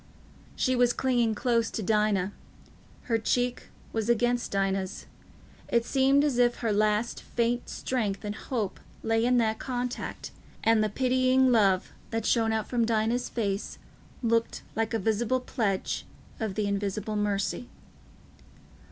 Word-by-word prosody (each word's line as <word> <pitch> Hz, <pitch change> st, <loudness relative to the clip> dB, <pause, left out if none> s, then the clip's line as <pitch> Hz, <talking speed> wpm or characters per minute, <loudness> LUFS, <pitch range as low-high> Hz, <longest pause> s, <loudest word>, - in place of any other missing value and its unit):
She 255 Hz, -1 st, +1 dB
was 245 Hz, -1 st, +4 dB
clinging 240 Hz, -4 st, +1 dB
close 230 Hz, -1 st, +1 dB
to 220 Hz, -, -4 dB
Dinah; 205 Hz, -2 st, +1 dB, 0.7 s
her 230 Hz, -2 st, 0 dB
cheek 245 Hz, +2 st, 0 dB, 0.3 s
was 225 Hz, 0 st, -1 dB
against 240 Hz, +1 st, +2 dB
Dinah's. 195 Hz, -1 st, -1 dB, 0.6 s
It 235 Hz, -1 st, +2 dB
seemed 275 Hz, +2 st, +3 dB
as 275 Hz, -5 st, +1 dB
if 240 Hz, -1 st, +4 dB
her 225 Hz, -3 st, +1 dB
last 215 Hz, +2 st, +1 dB
faint 240 Hz, +1 st, -1 dB
strength 215 Hz, -6 st, -2 dB
and 205 Hz, -, -2 dB
hope 215 Hz, -3 st, -3 dB, 0.2 s
lay 225 Hz, 0 st, +2 dB
in 250 Hz, +1 st, +3 dB
that 220 Hz, -2 st, +1 dB
contact, 250 Hz, -1 st, -4 dB, 0.3 s
and 225 Hz, -1 st, +4 dB
the 215 Hz, -, +1 dB
pitying 255 Hz, +2 st, +3 dB
love 195 Hz, -5 st, +3 dB, 0.2 s
that 225 Hz, -1 st, -2 dB
shone 225 Hz, -1 st, +2 dB
out 220 Hz, -1 st, -1 dB
from 240 Hz, -2 st, +1 dB
Dinah's 225 Hz, +2 st, +1 dB
face 200 Hz, -3 st, -2 dB, 0.5 s
looked 230 Hz, 0 st, +1 dB
like 225 Hz, +1 st, 0 dB
a -, -, +3 dB
visible 220 Hz, +4 st, +1 dB
pledge 215 Hz, -6 st, -2 dB, 0.3 s
of 215 Hz, -4 st, -2 dB
the 215 Hz, -, 0 dB
Invisible 200 Hz, +1 st, -2 dB
Mercy. 205 Hz, +3 st, -1 dB
225 Hz, 140 wpm, -28 LUFS, 210-245 Hz, 0.7 s, was